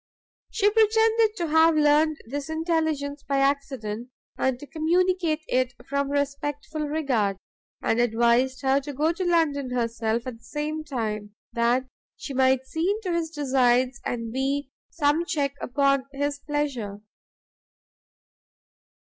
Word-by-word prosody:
She 415 -2 +1
pretended 445 0 +3
to 345 -5 -2
have 320 +1 +5
learned 305 +1 +4
this 285 +5 -5
intelligence 315 -3 -1
by 280 -1 -1
accident, 265 -5 -1 0.3
and 265 -2 0
to 290 - -9
communicate 330 0 +1
it 255 -1 0
from 280 0 -1
respectful 290 +2 -2
regard; 255 -10 0 0.5
and 225 - +1
advised 240 +3 +2
her 270 +1 +3
to 290 +1 -7
go 305 +5 +1
to 370 - -3
London 320 -6 +1
herself 230 -1 -1
at 245 -3 -6
the - - -28
same 305 +4 -4
time, 215 -7 -4 0.2
that 240 +2 +2 0.3
she 280 - -7
might 260 0 +3
see 320 +7 -1 0.2
into 360 - 0
his 330 -1 -1
designs, 260 -4 +2
and 230 -2 -3
be 275 +1 -1 0.2
some 300 +1 +1
check 285 -4 -1
upon 275 0 +1
his 285 +1 -2
pleasure. 275 -9 -3
280 Hz, 130 wpm, -25 LUFS, 250-315 Hz, 0.5 s, have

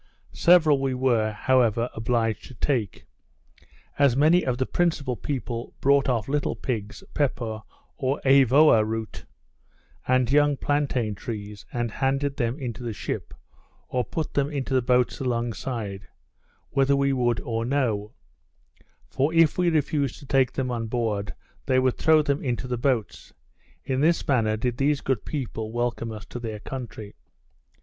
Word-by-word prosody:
Several 160 -5 +5
we 135 -1 0
were, 120 -4 +1
however, 115 0 +2
obliged 115 -1 -1
to 130 - -13
take, 115 -5 -2 0.9
as 140 -3 +4
many 160 +5 +4
of 125 -2 -1
the 130 - 0
principal 155 -7 0
people 120 -3 -5
brought 140 0 +3
off 115 -4 0
little 145 +1 -1
pigs, 110 - -4
pepper, 120 -7 -1 0.4
or 135 +1 -1
eavoa 135 -2 +6
root, 110 0 -5 0.8
and 130 -1 +2
young 145 0 +4
plantain 135 -7 0
trees, 105 -1 -7
and 120 -2 -2
handed 135 +3 -1
them 120 0 -1
into 125 -5 -5
the 120 -2 -4
ship, - - -5 0.6
or 125 -1 0
put 155 +7 -4
them 140 0 +1
into 140 -2 -3
the 130 - +3
boats 125 0 +1
along 120 -3 -1
side, 105 -4 -5 0.6
whether 135 0 +3
we 140 0 +2
would 120 -3 +1
or 115 -1 -2
no; 115 -5 -1 1.0
for 140 +4 0
if 165 0 +4
we 180 -1 +3
refused 145 -4 0
to - - -13
take 135 -1 +2
them 130 -2 -2
on 115 -2 -3
board, 110 -3 -2 0.3
they 130 -1 +3
would 130 -1 +1
throw 155 -1 +5
them 140 -1 -1
into 125 -1 -2
the 125 - -1
boats. 120 -3 -2 0.5
In 130 0 -1
this 165 +2 +2
manner, 110 -5 +2
did 120 +1 -2
these 145 +1 +2
good 130 -7 -2
people 115 -6 -4
welcome 120 -1 -2
us 110 -1 -8
to 120 - -7
their 110 -3 -5
country. 110 -4 -7
125 Hz, 155 wpm, -25 LUFS, 115-140 Hz, 1.0 s, eavoa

